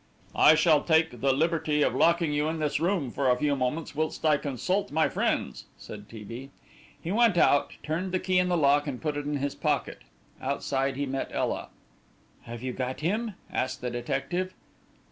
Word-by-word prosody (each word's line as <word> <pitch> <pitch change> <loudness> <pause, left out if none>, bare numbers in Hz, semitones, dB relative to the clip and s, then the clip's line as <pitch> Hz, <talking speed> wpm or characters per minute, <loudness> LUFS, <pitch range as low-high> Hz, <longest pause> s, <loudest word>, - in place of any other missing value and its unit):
"I 155 - +7
shall 155 -2 +4
take 160 -7 +2
the 135 - +3
liberty 155 +1 +1
of - - +1
locking 170 -1 +3
you 150 +1 +1
in 160 - -3
this 150 -2 -1
room 170 -6 0
for 135 +1 0
a 125 - +3
few 145 +1 +1
moments 140 +5 -2
whilst 155 +2 -2
I 155 -1 +5
consult 165 - -2
my 160 +1 +3
friends," - - -1
said 105 -1 -10
T. 110 -2 -9
B. 120 +6 -8 0.5
He 170 - -5
went 225 -3 +3
out, 145 -4 +3
turned 170 +5 -2
the 185 - +1
key 185 0 +1
in 180 0 +1
the 175 - +2
lock 145 -1 +3
and 130 -4 -4
put 150 -2 -2
it 145 0 -4
in 145 0 -1
his 140 0 -2
pocket. - - -1 0.4
Outside 135 0 -1
he 145 +1 -2
met 135 0 -3
Ela. - - -2 0.8
"Have 120 +1 -8
you 130 -1 -3
got 130 +2 -4
him?" 210 +6 -1 0.2
asked 130 +1 -2
the 125 0 -3
detective. 135 +10 -3
150 Hz, 195 wpm, -27 LUFS, 135-165 Hz, 0.8 s, I